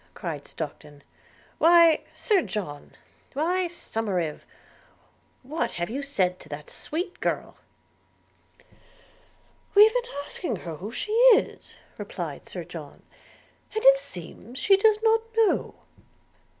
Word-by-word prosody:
cried 160 -7 -5
Stockton. 150 -2 -8 0.6
'Why, 335 -1 +6
Sir 415 -5 +2
John 175 - -6 0.2
– - - -33
why, 350 +6 0
Somerive, 200 - -3 1.0
what 300 +6 -2
have 175 +4 -3
you 270 +4 -3
said 185 -10 0
to - - -14
that 145 0 -8
sweet 350 +4 -4
girl?' - - -2 2.2
'We've 425 +2 +8
been - - -2
asking 300 -11 -3
her 165 -4 -7
who 205 +7 -7
she 420 - -5 0.2
is,' - - -3 0.3
replied - - -6
Sir - - -5
John; - - -10 0.7
'and 435 - -2
it 270 0 +9
seems 220 +1 -9
she 400 +4 +5
does 420 +2 +4
not 450 0 +4 0.2
know.' 445 -3 +2
275 Hz, 120 wpm, -26 LUFS, -, 2.2 s, it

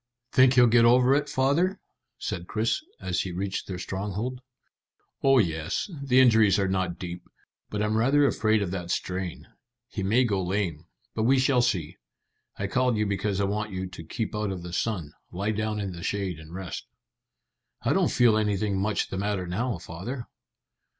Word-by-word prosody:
"Think 130 -1 +5
he'll 125 -1 +7
get 120 0 +5
over 125 +2 +5
it, 145 +1 +1
father?" 145 +8 +1 0.4
said 90 -4 -4
Chris, 115 - 0 0.2
as - - -1
he 95 - -4
reached 95 +2 -3
their 95 - -4
stronghold. 105 +7 -4 0.8
"Oh 135 0 +5
yes. 85 - 0
The 130 -2 +3
injuries 110 -6 +6
are 100 -1 +1
not 95 -2 -1
deep; 90 -1 -7 0.4
but 105 0 -2
I'm 105 +1 0
rather 135 +6 +4
afraid 110 -4 +2
of 90 - -3
that 90 -2 -4
strain. 90 0 -3 0.4
He 105 - -4
may 110 +7 +3
go 100 -5 0
lame; 90 -4 -2 0.3
but 110 - -2
we 130 +5 +4
shall 130 -1 +3
see. 90 -8 -1 0.6
I 100 - -2
called 125 +3 +1
you 105 - +1
because 100 0 -1
I - - +2
want 105 +1 -2
you 95 0 -3
to 90 -2 -9
keep 110 +7 -4
out 105 -1 -1
of 95 -3 -5
the 85 -1 -7
sun. 90 -7 -2 0.2
Lie 100 +4 -1
down 110 0 -2
in 100 -2 -3
the 85 -1 -8
shade 95 -3 -2
and 80 0 -12
rest." 95 0 -6 1.0
"I - - +2
don't - - +3
feel 120 -3 +4
anything 105 -2 0
much 105 0 0
the 95 - -3
matter 100 -2 -1
now, 110 +5 -2
father." 95 +10 -6
105 Hz, 185 wpm, -27 LUFS, 95-120 Hz, 1.0 s, he'll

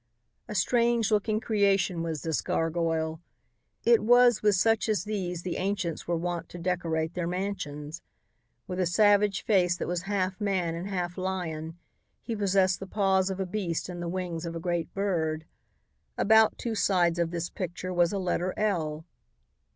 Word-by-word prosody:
A 210 - -6
strange 235 +3 +2
looking 215 +1 +1
creation 200 -6 +1
was 160 -3 -3
this 160 -2 0
gargoyle. 165 -1 -1 0.6
It 470 -2 +5
was 245 -1 +5
with 210 -2 +4
such 225 +4 +2
as 210 -6 +1
these 185 -5 -3
the 180 -2 -3
ancients 185 -4 -2
were 170 0 0
wont 170 0 -3
to 175 - -9
decorate 170 -2 -1
their 175 -2 -2
mansions. 170 -4 -4 0.6
With 185 -2 -5
a 180 - +2
savage 205 +2 +3
face 180 -4 +3
that - - -3
was 175 -1 -1
half 190 0 -1
man 185 -5 0
and 170 +3 -5
half 180 -1 -3
lion, 170 -4 -3 0.5
he 230 - -3
possessed 195 -3 +2
the 195 - -7
paws 190 -1 +2
of 190 0 -4
a 190 - 0
beast 180 -3 -3
and 175 -1 -6
the 170 - -3
wings 175 -2 -3
of 170 -1 -5
a - - -3
great 175 0 -2
bird. 160 -6 -1 0.7
About 220 0 +5
two 235 - -3
sides 175 -5 +2
of 170 -1 +1
this 170 0 -4
picture 185 0 -4
was 175 -1 +3
a 200 - -2
letter 180 -1 -1
L. 160 -7 -1
180 Hz, 170 wpm, -28 LUFS, 170-200 Hz, 0.7 s, It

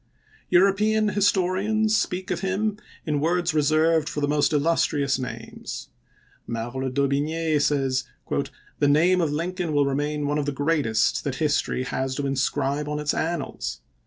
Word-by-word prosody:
European 210 +4 +3
historians 205 +2 +2
speak 185 -2 -1
of - - -1
him 200 +2 -1 0.3
in 150 -3 0
words 175 +2 +1
reserved 155 +1 +3
for - - -4
the 145 - 0
most 145 0 +2
illustrious 150 -2 +1
names. 125 - -7 0.6
Merle 120 +3 -3
d'Aubigne 145 +4 0
says, 135 -3 +1 0.4
" - - -19
The 145 - +3
name 170 +6 +4
of 160 -3 0
Lin 165 +5 -2
coln 175 -4 -3
will 145 -1 +3
remain 145 +2 -1
one 145 +1 0
of 145 - -2
the - - +1
greatest 140 -7 +1
that 140 -2 -2
history 150 -4 0
has 130 0 -2
to 145 - -2
inscribe 140 +2 -1
on 150 - -2
its 150 -1 -1
annals.'' 170 +1 -3
150 Hz, 155 wpm, -24 LUFS, 140-180 Hz, 0.6 s, name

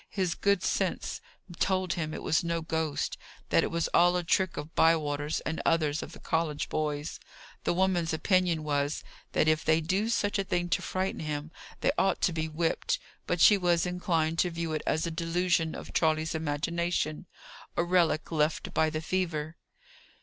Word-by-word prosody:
His 185 -4 -1
good 200 -2 +1
sense - - -1 0.4
told 185 -2 +1
him 155 -2 -3
it - - -6
was 160 - +2
no 170 -1 -1
ghost; 160 -2 -2 0.3
that - - +4
it - - -1
was 170 -1 0
all 175 +1 +4
a 175 - -1
trick 185 +1 +1
of 150 +2 -6
Bywater's 150 -2 +2
and 160 0 -3
others 155 -2 +1
of - - -8
the - - -11
college 160 -3 -1
boys. 150 0 -2 0.5
The - - +2
woman's 180 -3 +1
opinion 175 -1 +2
was, 145 0 -1 0.3
that 155 - +2
if 155 0 +3
they 160 0 +3
did 160 - -7
do 200 +5 +1
such 205 -3 +1
a - - +1
thing 175 -2 -1
to - - +1
frighten 190 +1 -2
him, 150 0 -4 0.3
they - - +3
ought 190 -1 +2
to 175 - +2
be 160 -1 -1
whipped; 165 +1 0 0.3
but 175 - 0
she 205 -2 +7
was 175 -2 +2
inclined 170 -3 0
to 180 - +3
view 165 -1 -3
it 155 - -1
as 160 +2 +1
a 170 - -2
delusion 165 0 0
of - - -9
Charley's 155 -1 +1
imagination, 160 +1 -1 0.5
a - - +3
relic 170 -3 +2
left 155 -1 0
by 160 - +3
the 155 0 -3
fever. 160 -3 -2
165 Hz, 185 wpm, -29 LUFS, 155-175 Hz, 0.5 s, she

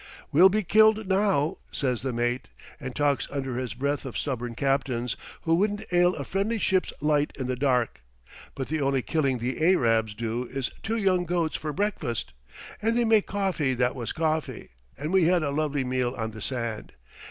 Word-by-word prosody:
'We'll 180 +6 +7
be 215 +2 0
killed 220 +3 +4
now,' 190 -4 +2
says 125 -4 0
the 130 0 -2
mate, 120 +2 -1 0.3
and 130 -1 -6
talks 145 -4 +1
under 135 -3 -3
his 125 -3 -4
breath 140 +3 -1
of 130 - -5
stubborn 120 -4 -3
captains, 130 -2 0 0.3
who 165 - +2
wouldn't 205 +4 +1
'ail 175 +1 +4
a 140 - -4
friendly 200 - -1
ship's 190 -3 +1
light 150 0 +2
in 130 - -3
the 130 0 -1
dark, 125 - 0 0.5
but 135 - -4
the 155 0 -1
only 135 -2 +1
killing 140 -5 +1
the 125 +5 -3
Ayrabs 115 - +3
do 115 +2 -2
is 135 0 -3
two 225 +2 -2
young 185 -4 +2
goats 170 -2 0
for 155 - -3
breakfast. 190 - -2 0.5
And 225 +2 +1
they 240 - +3
make 220 -2 +4
coffee 185 -10 0
that 125 0 +1
was 120 -5 -4
coffee, 160 -1 -2 0.3
and 150 +7 -3
we 190 -3 +5
had 175 -1 +3
a 145 - -1
lovely 145 -1 0
meal 125 0 -1
on 110 -1 -3
the 110 0 -10
sand. 115 -2 -4
140 Hz, 185 wpm, -26 LUFS, 125-180 Hz, 0.5 s, We'll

